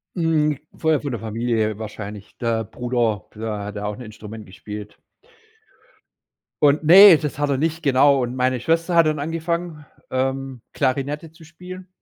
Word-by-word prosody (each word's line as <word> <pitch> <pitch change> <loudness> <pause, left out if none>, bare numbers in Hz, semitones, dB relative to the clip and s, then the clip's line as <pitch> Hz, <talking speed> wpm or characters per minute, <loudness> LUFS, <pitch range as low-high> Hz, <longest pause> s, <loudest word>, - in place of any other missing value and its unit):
Mhm. 155 -4 +1 0.2
Früher 160 -3 +1
von 145 -3 -4
der 120 - -4
Familie 110 -1 -1
wahrscheinlich. 105 -2 -8
Der 115 -1 -1
Bruder, 120 -4 -2
der 110 -1 -4
hat 105 0 -7
auch 105 0 -3
'n - - -10
Instrument 110 -1 -10
gespielt. 105 +2 -9 1.7
Und 145 +2 +4
Ne, 185 +1 +9
das 150 -2 -4
hat 145 -1 0
er 135 - +1
nicht, 160 +2 -1
genau. 140 0 +4
Und 120 +1 -4
meine 130 -1 +1
Schwester 165 +5 0
hat 165 -1 +6
dann 155 -1 0
angefangen, 165 0 -3 0.2
ähm, 130 -1 -2
Klarinette 145 +4 -2
zu 160 0 -17
spielen. 180 +3 -11
135 Hz, 155 wpm, -22 LUFS, 110-160 Hz, 1.7 s, Ne